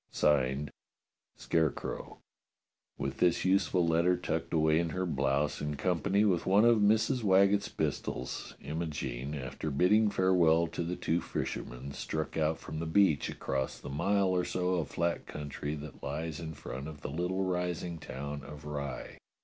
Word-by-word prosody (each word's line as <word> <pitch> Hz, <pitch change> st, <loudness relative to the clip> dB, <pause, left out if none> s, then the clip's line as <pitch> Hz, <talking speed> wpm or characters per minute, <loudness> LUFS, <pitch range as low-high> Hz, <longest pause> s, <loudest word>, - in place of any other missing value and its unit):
[Signed] 70 Hz, -1 st, +1 dB, 0.7 s
Scarecrow. 80 Hz, -2 st, -1 dB, 0.8 s
With 70 Hz, 0 st, -3 dB
this 90 Hz, 0 st, +3 dB
useful 95 Hz, -2 st, +3 dB
letter 85 Hz, +2 st, +3 dB
tucked 80 Hz, -2 st, -3 dB
away 80 Hz, -1 st, +3 dB
in 85 Hz, -1 st, 0 dB
her 95 Hz, +3 st, -2 dB
blouse 70 Hz, -2 st, 0 dB
in 75 Hz, 0 st, -2 dB
company 95 Hz, +6 st, +1 dB
with 90 Hz, -5 st, +1 dB
one 100 Hz, +4 st, +5 dB
of 120 Hz, -2 st, +6 dB
Mrs. 110 Hz, +5 st, +3 dB
Waggetts' 100 Hz, 0 st, +4 dB
pistols, -, -, -3 dB
Imogene, 75 Hz, -3 st, -4 dB
after 70 Hz, +3 st, -4 dB
bidding 100 Hz, +9 st, +4 dB
farewell 90 Hz, -4 st, +4 dB
to 85 Hz, +1 st, -4 dB
the 85 Hz, +1 st, -2 dB
two 85 Hz, 0 st, 0 dB
fishermen, 60 Hz, +3 st, -4 dB
struck 80 Hz, +2 st, -4 dB
out 80 Hz, 0 st, +1 dB
from 80 Hz, -, -7 dB
the 85 Hz, -, -3 dB
beach 80 Hz, -4 st, +3 dB
across 65 Hz, -1 st, -2 dB
the -, -, -8 dB
mile 100 Hz, +7 st, +2 dB
or 90 Hz, -1 st, +2 dB
so 90 Hz, 0 st, -1 dB
of 85 Hz, -3 st, -1 dB
flat 85 Hz, 0 st, -1 dB
country 75 Hz, 0 st, -4 dB
that 75 Hz, -1 st, -9 dB
lies 80 Hz, +2 st, -4 dB
in 80 Hz, -2 st, -6 dB
front 65 Hz, +3 st, -6 dB
of 75 Hz, -2 st, -9 dB
the 70 Hz, -, -5 dB
little 90 Hz, +4 st, -1 dB
rising 90 Hz, -2 st, -2 dB
town 70 Hz, +1 st, -6 dB
of 75 Hz, 0 st, -10 dB
Rye. 70 Hz, -3 st, -5 dB
80 Hz, 155 wpm, -31 LUFS, 75-90 Hz, 0.8 s, of